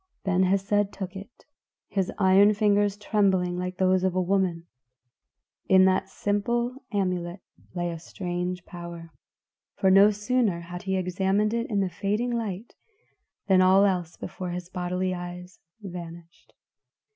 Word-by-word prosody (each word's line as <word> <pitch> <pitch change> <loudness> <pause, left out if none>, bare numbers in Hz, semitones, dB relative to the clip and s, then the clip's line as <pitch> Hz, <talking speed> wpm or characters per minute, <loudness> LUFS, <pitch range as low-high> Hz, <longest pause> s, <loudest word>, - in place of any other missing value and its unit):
Ben 185 -2 +1
Hesed 195 +2 +1
took 190 -1 -7
it, 200 +6 -11 0.4
his 195 -2 -1
iron 200 +1 +5
fingers 205 -1 +2
trembling 195 -4 +1
like 180 0 -4
those 185 -1 +2
of 185 -1 0
a - - +2
woman. 180 -2 0 1.0
In 190 0 +7
that 190 0 +1
simple 235 +5 -1
amulet 180 -3 -2 0.4
lay 175 -1 -1
a 165 - -6
strange 180 0 -4
power, 170 -1 -9 0.6
for 190 - +2
no 195 +2 +7
sooner 210 -3 0
had 175 +1 -8
he 190 -1 -1
examined 190 +3 0
it 235 0 -2
in 205 -3 +1
the 190 - +1
fading 210 +8 -1
light, 225 -2 -4 0.7
than 190 -2 +4
all 190 +2 +6
else 180 -4 -1
before 185 -1 -6
his 175 0 -5
bodily 180 0 -2
eyes 180 0 -8 0.2
vanished. 170 -2 -10
190 Hz, 140 wpm, -26 LUFS, 180-205 Hz, 1.0 s, In